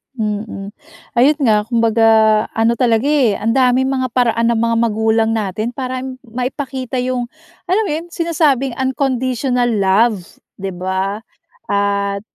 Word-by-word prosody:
Mm, 210 -3 -4 0.5
ayun 285 +5 +4
nga, 210 -3 +2
kumbaga 230 -1 +2 0.5
ano 225 +1 +2
talaga, 230 -1 +2
eh, 280 -8 +3
ang 220 +3 -1
daming 260 +1 +2
mga 260 -1 0
paraan 230 -2 +2
ng 235 - +2
mga 230 +1 +1
magulang 220 0 +1
natin 215 +1 -2
para 255 -1 -3 0.2
maipakita 255 +2 -4
yung, 250 -1 -2 0.4
alam 385 +5 +2
mo 400 - -3
yun, 315 +3 -3
sinasabing 300 -7 0
unconditional 260 -1 0
love, 210 +1 +2 0.4
'di 195 0 -4
ba? 190 +3 -3 0.5
At 200 0 0
235 Hz, 130 wpm, -17 LUFS, 215-260 Hz, 0.5 s, ayun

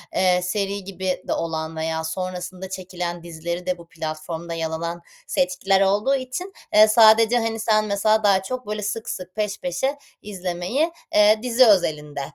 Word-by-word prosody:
eee, 180 -1 +3
seri 200 +1 -2
gibi 185 -1 -3
de - - 0
olan 160 -1 -3
veya 160 0 -2
sonrasında 185 +2 -5
çekilen 180 -2 -5
dizileri 170 +1 -5
de 180 -1 -1
bu 170 -1 -14
platformda 165 0 -6
yer 165 -1 -2
alan 170 +2 -4 0.3
seçkiler 195 +2 +1
olduğu 205 +8 +2
için, 270 +9 -5 0.2
eee, 215 +1 +8
sadece, 225 +1 +6
hani, 225 -1 -2
sen 215 -1 +2
mesela 215 +1 +2
daha 195 -2 +4
çok 255 +1 -5
böyle 210 0 -3
sık 220 +2 -3
sık, 185 +1 -6
peş 210 -1 -2
peşe 265 +12 -1 0.2
izlemeyi, 190 - -2 0.2
eee, 210 +1 +6
dizi 250 +1 +5
özelinde, 150 -8 +2
190 Hz, 160 wpm, -23 LUFS, 170-215 Hz, 0.3 s, eee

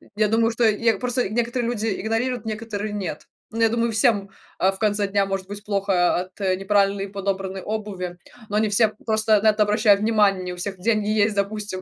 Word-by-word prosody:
Я 215 0 +2
думаю, 225 +1 +2
что 235 +1 -1
я 225 0 +1
просто 245 -1 -1
некоторые 240 +1 -1
люди 225 -2 -2
игнорируют, 225 +2 -1
некоторые- 215 -1 -4
нет. 185 -7 -5 0.2
Ну, 225 - -3
я 225 - +5
думаю, 230 0 0
всем, 215 -4 +2 0.3
а, 190 +1 +3
в 190 - -10
конце 205 -2 +1
дня 200 0 +1
может 195 -1 -4
быть 205 +1 -8
плохо 195 -3 +1
о - - +1
от, 185 +2 -11
э, 185 -1 +1
неправильный 200 0 +1
подобранной 195 -1 -3
обуви, 195 -4 -5 0.3
но 210 - 0
не 220 - +2
все 215 +2 +4 0.2
просто 220 -1 +2
на 220 - +5
это 210 0 +2
обращают 210 -1 +3
внимание. 205 -4 +2
Не 180 0 -4
у - - -10
всех 190 +1 -4
деньги 215 +1 +1
есть, 215 0 +2
допустим 200 -1 -2
210 Hz, 210 wpm, -23 LUFS, 195-220 Hz, 0.3 s, я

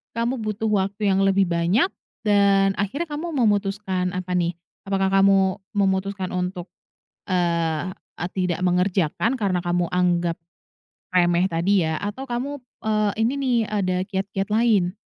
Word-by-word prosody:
kamu 235 +2 -1
butuh 215 0 -2
waktu 205 0 0
yang 195 +1 +2
lebih 195 -1 +3
banyak, 170 - +2 0.4
dan 200 -2 +4
akhirnya 275 - -2
kamu 310 +3 -4
memutuskan 200 -5 0
apa 185 0 -4
nih, 175 -1 0 0.3
apakah 195 -1 +1
kamu 195 0 +4 0.2
memutuskan 195 -1 0
untuk, 180 0 -3 0.6
eee, 170 -2 0 0.4
tidak 180 -2 0
mengerjakan, 180 - +1
karena 195 -6 0
kamu 175 0 +1
anggap 175 -2 +1 0.8
remeh 175 0 +3
tadi 175 +2 +2
ya, 160 0 -1
atau 205 +7 -4
kamu, 260 +4 -3 0.3
eee, 215 -1 +2
ini 230 +4 +2
nih, 260 -3 +1
ada 190 -3 0
kiat-kiat 195 0 -3
lain? 215 -6 +3
195 Hz, 130 wpm, -23 LUFS, 180-210 Hz, 0.8 s, dan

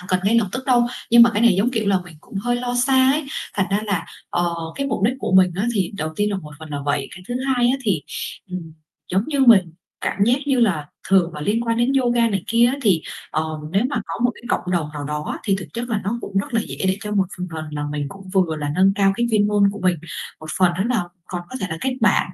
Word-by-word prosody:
không 180 - -13
cần 185 0 +2
ngay 215 +4 +3
lập 210 -4 0
tức 260 +1 -4
đâu, 245 -2 +4 0.2
nhưng 235 0 +9
mà 235 - +7
cái 215 0 0
này 235 -4 +6
giống, 225 +5 +2
kiểu 220 -4 -1
là, 195 -2 +4
mình 175 -2 -13
cũng - - -16
hơi 245 +4 0
lo 245 0 -2
xa 260 +1 +4
ấy, 305 +1 -1 0.3
thành 190 -2 +1
ra 200 +2 +2
là, 195 -5 -1 0.3
ờ, 175 -1 0 0.2
cái 275 - -2
mục 265 - -2
đích 240 +4 +3
của 255 - -3
mình 185 -1 +6
á 205 - 0
thì 190 -4 0
đầu 155 -5 -2
tiên 205 0 +1
là 200 - -1
một 155 -5 -8
phần 160 -1 -10
là 145 - -3
vậy. 145 -1 -1
Cái 180 - -11
thứ 245 - -3
hai 250 -3 +2
á 255 +2 +3
thì, 195 - 0 0.5
ừm, 175 -3 -6 0.4
giống 190 - +3
như 285 -3 -1
mình 200 -10 +6 0.3
cảm 200 - +1
giác 240 +3 +4
như 270 -3 +2
là 175 -10 +2 0.2
thường 180 -4 +3
là 150 - -6
liên 205 +9 0
quan 230 0 +1
đến 240 +3 +2
yoga 240 -3 +3
này 195 -4 -1
kia 230 +1 +4
á, 255 +3 0
thì, 185 -9 +3 0.3
ờ, 155 - 0 0.3
nếu 200 +5 +2
mà - - -2
có - - -5
một 245 - +4
cái - - -16
cộng 180 - -1
đồng 165 -4 0
nào 145 -1 -5
đó 150 +1 -3
á, - - -5
thì 195 -3 +2
thực 185 - -7
chất 240 +1 -4
là 215 -3 0
nó 220 +5 -1
cũng 195 -3 -2
rất 200 - -3
là 225 - +3
dễ - - -7
để 190 0 +2
cho 210 +1 -5
một 195 -2 +3
phần 180 - -3
phần 160 -1 -4
là 150 -1 -3
mình 145 -1 -2
cũng 195 +2 -12
vừa 180 -5 +2
là 145 -1 -3
nâng 190 +3 +4
cao 195 -1 +3
cái 235 +1 +1
chuyên 210 -2 +3
môn 205 -1 +2
của 205 - -8
mình, 180 -1 +3 0.4
một 155 - -9
phần 180 -2 +4
nữa 190 - +1
là 245 -6 +1 0.2
còn 175 -1 -5
có 255 - -5
thể - - -1
là 160 - -4
kết 260 +5 -1
bạn 210 -4 +3
200 Hz, 285 wpm, -21 LUFS, 180-235 Hz, 0.5 s, nhưng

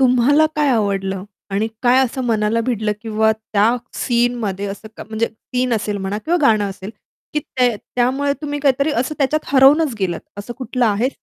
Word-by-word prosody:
तुम्हाला 260 +4 +4
काय 295 -2 +2
आवडलं 195 -4 0 0.3
आणि 205 +3 0
काय 250 +1 +5
असं 260 +1 -4
मनाला 220 -1 +1
भिडलं 215 -4 0
किंवा 220 -1 +2
त्या 220 +1 +1 0.2
सीनमध्ये 235 -5 0
असं 200 +2 -7
क - - -11
म्हणजे 220 +1 0
सीन 250 +2 -3
असेल 210 -1 -2
म्हणा 195 +1 -3
किंवा 345 +2 +2
गाणं 215 -5 +4
असेल, 190 +1 -8 0.4
की 300 - +1
ते 250 -4 0
त्यामुळे 260 +6 0
तुम्ही 290 0 -3
काहीतरी 280 +1 +2
असं 260 +5 -2
त्याच्यात 290 +2 +1
हरवूनच 275 +1 +5
गेलात. 175 -3 -1 0.2
असं 205 +4 -6
कुठलं 250 -1 0
आहे? 220 +4 +1
235 Hz, 170 wpm, -19 LUFS, 210-260 Hz, 0.4 s, काय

